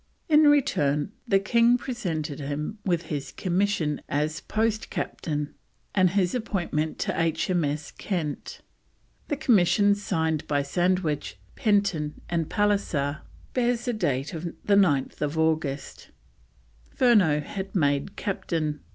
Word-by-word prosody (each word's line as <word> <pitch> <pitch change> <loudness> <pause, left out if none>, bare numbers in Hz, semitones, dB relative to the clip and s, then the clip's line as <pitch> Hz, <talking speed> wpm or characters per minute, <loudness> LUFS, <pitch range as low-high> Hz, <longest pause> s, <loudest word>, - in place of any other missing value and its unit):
In 305 -1 +6
return 195 - +2 0.2
the 195 - +4
King 235 +5 +4
presented 170 - -4
him 150 +8 -4
with 175 -3 0
his 140 -3 -4
commission 180 -5 0
as 150 +2 -1
Post 220 0 -1
Captain 150 -2 -3 0.4
and 185 -2 +4
his 185 -1 +1
appointment 175 -9 -2
to - - -1
H.M.S. 160 -2 0
Kent. 165 -7 -4 0.7
The 290 - -1
commission, 205 - +4
signed 160 -6 -1
by 145 -1 +1
Sandwich, 170 - 0 0.2
Penton, 200 -8 +1
and 165 -2 0
Pallisser, 175 -9 0 0.3
bears 240 -1 +1
date 160 - -1 0.4
9th 155 -6 +2
August. 160 -3 -1 0.8
Furneaux 195 - +4
was 195 0 -5
made 145 +2 +1
Captain. 160 -6 -2
175 Hz, 110 wpm, -26 LUFS, 150-205 Hz, 0.8 s, In